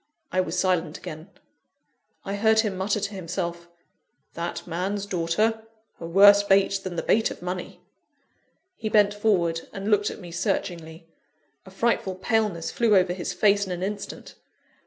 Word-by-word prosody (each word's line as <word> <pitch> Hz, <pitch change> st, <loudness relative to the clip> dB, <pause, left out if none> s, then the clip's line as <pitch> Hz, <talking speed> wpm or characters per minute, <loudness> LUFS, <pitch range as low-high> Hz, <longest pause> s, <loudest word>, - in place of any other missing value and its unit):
I 185 Hz, -, +2 dB
was 180 Hz, 0 st, -4 dB
silent 180 Hz, -4 st, 0 dB
again. 160 Hz, 0 st, -9 dB, 1.0 s
I 195 Hz, -, -3 dB
heard 220 Hz, +2 st, +3 dB
him 210 Hz, -4 st, -2 dB
mutter 195 Hz, +3 st, -1 dB
to 205 Hz, +1 st, -4 dB
himself: 170 Hz, -2 st, -4 dB, 0.6 s
"That 170 Hz, +1 st, -5 dB
man's 190 Hz, +4 st, -3 dB
daughter! 200 Hz, +5 st, 0 dB, 0.4 s
a 165 Hz, -, -6 dB
worse 200 Hz, +3 st, +7 dB
bait 195 Hz, -1 st, +3 dB
than 185 Hz, -2 st, -5 dB
the -, -, -2 dB
bait 220 Hz, +1 st, +2 dB
of -, -, -9 dB
money!" 180 Hz, 0 st, -5 dB, 0.9 s
He 220 Hz, -, -4 dB
bent 205 Hz, -1 st, +4 dB
forward, 180 Hz, -6 st, 0 dB
and 200 Hz, +2 st, -4 dB
looked 205 Hz, 0 st, +3 dB
at -, -, -8 dB
me 175 Hz, -3 st, -10 dB
searchingly. 165 Hz, -1 st, -3 dB, 0.6 s
A -, -, -9 dB
frightful 195 Hz, -1 st, 0 dB
paleness 205 Hz, -3 st, -1 dB
flew 230 Hz, -3 st, +3 dB
over 180 Hz, -2 st, +3 dB
his 180 Hz, +1 st, -4 dB
face 200 Hz, +2 st, +2 dB
in -, -, -5 dB
an 180 Hz, 0 st, -3 dB
instant. 205 Hz, +1 st, -6 dB
190 Hz, 155 wpm, -25 LUFS, 175-205 Hz, 1.0 s, worse